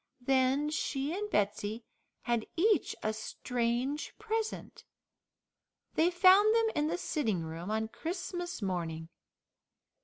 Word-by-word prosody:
Then 270 +3 +2
she 290 -1 -1
and 420 +1 -3
Betsey 210 - 0 0.4
had 235 -2 0
each 415 +5 +2
a 215 - 0
strange 240 +5 -2
present. 440 0 -3 1.1
They 330 +2 +4
found 385 +4 +6
them 455 -1 +3
in 300 0 +1
the 340 +3 -1
sitting 220 - -1
room 165 +3 -6
on 220 +1 0
Christmas 350 - -4
morning. 165 -4 -3
270 Hz, 115 wpm, -31 LUFS, 215-355 Hz, 1.1 s, found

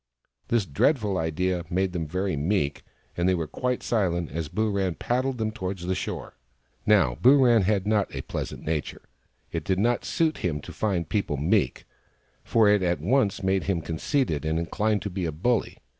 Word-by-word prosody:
This 115 -4 +1
dreadful 100 - +1
idea 85 +3 -1
made 95 +1 0
them 80 -3 -2
very 95 +2 -1
meek, 75 -1 0 0.3
and 85 +1 +1
they 95 - +3
were 85 -2 -2
quite 125 - -2
silent 90 -7 0
as 80 0 -3
Booran 100 -4 0
paddled 130 +1 -1
them 110 -1 -1
towards 95 -4 -5
the 95 - 0
shore. - - -5 0.5
Now, 90 - +4
Booran 125 -6 +6
had 100 -1 +1
not 105 -2 +1
a - - -4
pleasant - - -5
nature. 80 -2 -3 0.5
It 85 -2 -3
did 95 +3 0
not 120 +5 +1
suit 160 -1 0
him 80 -5 -1
to - - -10
find 95 -7 -1
people 85 -4 -1
meek, 75 +3 +1 0.6
for 110 -2 +3
it 105 -1 +4
at 90 -1 +1
once 120 -7 +1
made 95 0 +1
him 95 -3 0
conceited 80 - -1
and 80 +1 0
inclined 105 +5 0
to 100 - -4
be 90 -1 -2
a 80 - -1
bully. 110 +10 0
95 Hz, 180 wpm, -26 LUFS, 85-110 Hz, 0.6 s, Booran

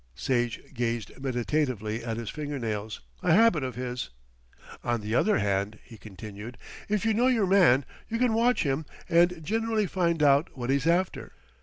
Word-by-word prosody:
Sage 120 - -1
gazed 115 -3 -2
meditatively 125 -4 -1
at 115 -1 -3
his 115 -2 -4
finger 145 -2 -4
nails, 110 -3 -4 0.2
a 180 -3 +3
habit 215 -5 +5
of 130 -1 -4
his. 125 - -4 0.7
"On 120 -1 0
the 105 +1 -4
other 210 - +3
hand," 100 +1 -1
he 115 - -13
continued, 105 +2 -9 0.3
"if 210 +1 0
you 225 - +3
know 240 +4 +3
your 235 -6 +3
man, 175 -9 +5 0.2
you 230 - -1
can 245 -1 +2
watch 235 +2 +3
him 140 +1 -1 0.2
and 170 0 +3
generally 225 +2 0
find 170 -4 0
out 140 +1 +3
what 125 +1 -2
he's 140 +3 +1
after. 175 +2 0
135 Hz, 170 wpm, -27 LUFS, 115-185 Hz, 0.7 s, habit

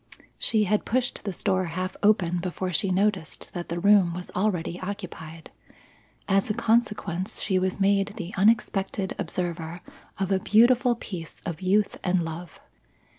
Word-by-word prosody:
She 220 -2 +2
had 210 +1 +1
pushed 245 -1 -1
this 195 -4 -5
door 185 -2 +2
half 185 +3 -3
open 180 -5 +3
before 180 +1 -3
she 185 +3 0
noticed 190 -3 -1
that 175 -1 -5
the 170 - -2
room 190 -3 +5
was 180 0 -7
already 180 -3 -1
occupied. 175 -5 -7 0.8
As 195 +1 +2
a 210 - 0
consequence, 210 -6 0
she 190 -2 +1
was 185 +1 -1
made 200 +1 +2
the 185 -4 -6
unexpected 195 -2 +1
observer 170 -1 -3 0.4
of 195 0 -1
a 190 - +3
beautiful 240 +4 +4
picture 180 -8 -7
of 170 -3 -4
youth 200 +3 +1
and 180 -2 +1
love. 165 +1 -7
190 Hz, 150 wpm, -26 LUFS, 175-205 Hz, 0.8 s, room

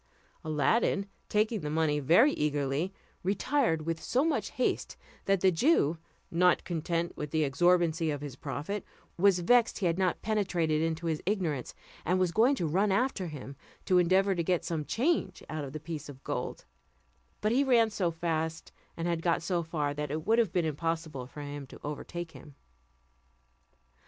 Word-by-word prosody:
Aladdin, 160 - +1 0.2
taking 215 +1 +1
the 150 - -3
money 155 -1 +1
very 175 - +5
eagerly, 150 +3 0 0.3
retired 200 - +1
with 165 0 -2
so 260 +4 +1
much 330 - 0
haste, - - -1 0.3
that 195 -2 +2
the 190 - +5
Jew, 165 - +3 0.3
not 180 +1 +3
content 170 0 -2
with 150 - -5
the 155 +1 +1
exorbitancy 170 +2 +2
of 145 -2 -2
his 145 -4 -6
profit, 155 +8 -4 0.3
was 185 0 +4
vexed 235 +6 +4
he 195 - -2
had 170 +1 +1
not 185 -2 0
penetrated 175 -8 +1
into 165 +1 -1
his 160 -2 -1
ignorance, 170 - -1 0.3
and 180 +3 +1
was 185 -2 +2
going 235 +9 +4
to 175 - -2
run 190 +6 +2
after 200 -3 0
him, 140 -3 -8 0.3
to 185 -2 +4
endeavour 190 +3 +3
to 175 - -1
get 180 0 0
some 160 -3 -2
change 245 - 0
out 155 0 -4
of 135 - -6
the 155 - -5
piece 155 -1 -6
of 135 -2 -11
gold; - - -4 0.7
but 215 - +1
he 265 +4 +3
ran 235 -4 +4
so 190 -4 0
fast, 160 -1 -3 0.3
and 165 +1 -2
had 170 -1 0
got 170 -1 +1
so 175 0 0
far, 155 -3 -2
that 150 0 -4
it 155 +3 -3
would 225 +2 +4
have 220 -7 +2
been 175 -2 +1
impossible 160 -3 -3
for 150 - -9
him 145 -1 -6
to - - -12
overtake 165 +3 -5
him. 145 -4 -13
170 Hz, 175 wpm, -30 LUFS, 155-195 Hz, 0.7 s, very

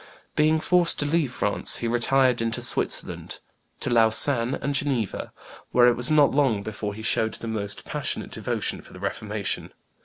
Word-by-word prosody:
Being 155 +1 +3
forced 175 +1 +3
to 145 - -1
leave 150 -3 0
France, 105 -4 0
he 120 - -3
retired 125 +1 +2
into 115 0 -1
Switzerland, - - -1 0.4
to - - 0
Lausanne 115 +2 +3
and 140 - -3
Geneva, 135 -7 -2 0.4
where 125 0 +6
it 120 - +4
was 120 +1 +4
not 150 -2 +4
long 130 -8 +1
before 105 -1 -5
he 110 - -9
showed 110 0 +1
the 115 - -8
most 105 -3 -4
passionate - - -2
devotion - - -3
for - - -15
the - - -11
Reformation. - - -4
120 Hz, 165 wpm, -24 LUFS, 110-145 Hz, 0.4 s, where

